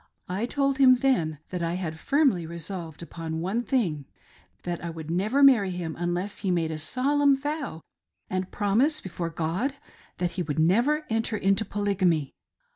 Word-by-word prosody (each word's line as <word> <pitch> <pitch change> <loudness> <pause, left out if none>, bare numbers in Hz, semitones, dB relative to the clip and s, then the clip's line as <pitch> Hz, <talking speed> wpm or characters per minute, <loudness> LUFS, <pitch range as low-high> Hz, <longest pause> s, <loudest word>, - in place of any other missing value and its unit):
I 195 +6 -2
told 275 0 0
him 255 -2 +8
then 240 - +1
that 180 -1 -3
I 170 +1 -1
had 160 -3 -4
firmly 270 - +2
resolved 170 -1 -5
upon 165 -1 -5
one 195 +8 -1
thing— 190 - 0 0.6
that 175 -1 -3
I - - -3 0.2
never 195 +10 0
would 280 - +8
marry 230 -8 +6
him 175 -3 -4
unless 175 +3 -2
he 200 - -2
made 170 -3 +1
a 155 - -4
solemn 275 - +2
vow 290 - -4 0.5
and 185 0 -2
promise 235 +10 +2
before 170 -2 -4
God 170 - -2 0.4
that 175 -1 -1
he 185 - -3
would 150 -4 -3
never 240 - +3
enter 225 -1 0
into 195 +2 +2
Polygamy. 185 -8 0
190 Hz, 165 wpm, -26 LUFS, 170-255 Hz, 0.6 s, him